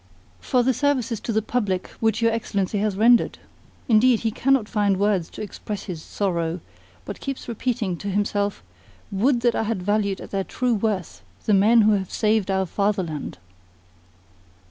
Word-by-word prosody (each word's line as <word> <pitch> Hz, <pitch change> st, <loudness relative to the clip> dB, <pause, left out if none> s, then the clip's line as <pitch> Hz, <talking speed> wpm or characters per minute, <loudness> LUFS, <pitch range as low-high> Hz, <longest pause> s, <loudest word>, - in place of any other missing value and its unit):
"For 250 Hz, -3 st, +1 dB
the 260 Hz, +2 st, +2 dB
services 250 Hz, -5 st, 0 dB
to 230 Hz, -, -4 dB
the 220 Hz, -1 st, +1 dB
public 205 Hz, -6 st, -1 dB
which 225 Hz, 0 st, +1 dB
your 230 Hz, -, +4 dB
Excellency 205 Hz, -3 st, -1 dB
has 210 Hz, -1 st, 0 dB
rendered. 230 Hz, +2 st, +4 dB, 0.5 s
Indeed, 235 Hz, +1 st, +4 dB
he 225 Hz, -, 0 dB
cannot 265 Hz, -1 st, +2 dB
find 205 Hz, -4 st, +1 dB
words 200 Hz, -4 st, +1 dB
to -, -, -7 dB
express 210 Hz, 0 st, -6 dB
his 175 Hz, -5 st, -6 dB
sorrow, 170 Hz, -2 st, -2 dB, 0.5 s
but -, -, -7 dB
keeps 275 Hz, -1 st, -5 dB
repeating 225 Hz, -5 st, -2 dB
to 205 Hz, -, -7 dB
himself: 205 Hz, -, -1 dB, 0.5 s
'Would 235 Hz, +6 st, +2 dB
that 240 Hz, 0 st, +3 dB
I -, -, 0 dB
had 215 Hz, -4 st, -2 dB
valued 200 Hz, -1 st, 0 dB
at -, -, -10 dB
their 195 Hz, -1 st, -1 dB
true 250 Hz, +4 st, -1 dB
worth 195 Hz, -, -2 dB, 0.2 s
the 215 Hz, -, +3 dB
men 215 Hz, +4 st, +5 dB
who 215 Hz, 0 st, +4 dB
have 195 Hz, -3 st, 0 dB
saved 215 Hz, -2 st, +1 dB
our 190 Hz, 0 st, +1 dB
fatherland! 185 Hz, -5 st, -2 dB
210 Hz, 165 wpm, -23 LUFS, 195-230 Hz, 0.5 s, men